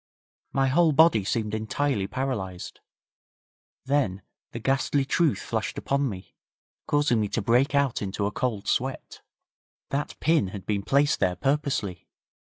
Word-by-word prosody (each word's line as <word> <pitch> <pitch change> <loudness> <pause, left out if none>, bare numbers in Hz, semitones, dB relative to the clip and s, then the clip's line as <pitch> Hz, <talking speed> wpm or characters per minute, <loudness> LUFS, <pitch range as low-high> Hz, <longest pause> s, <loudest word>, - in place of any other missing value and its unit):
My 135 0 +2
whole 160 +3 +4
body 150 -8 +5
seemed 105 +1 -2
entirely 110 0 -1
paralysed. 105 -8 -4 1.1
Then 130 -10 0 0.3
the - - -6
ghastly 135 +1 +1
truth 155 +2 +2
flashed 110 -2 -3
upon 140 -1 0
me, 95 -3 -9 0.5
causing 145 -6 +2
me 105 - 0
to 115 - -2
break 125 +7 +3
out 140 -3 +1
into 100 0 -2
a 100 - -1
cold 110 -4 -2
sweat. 130 +1 -2 0.7
That 145 +2 -3
pin 160 - +2
had 95 0 -8
been 100 -1 -1
placed 140 +7 +2
there 90 0 +1
purposely. 135 - -1
125 Hz, 140 wpm, -26 LUFS, 100-140 Hz, 1.1 s, body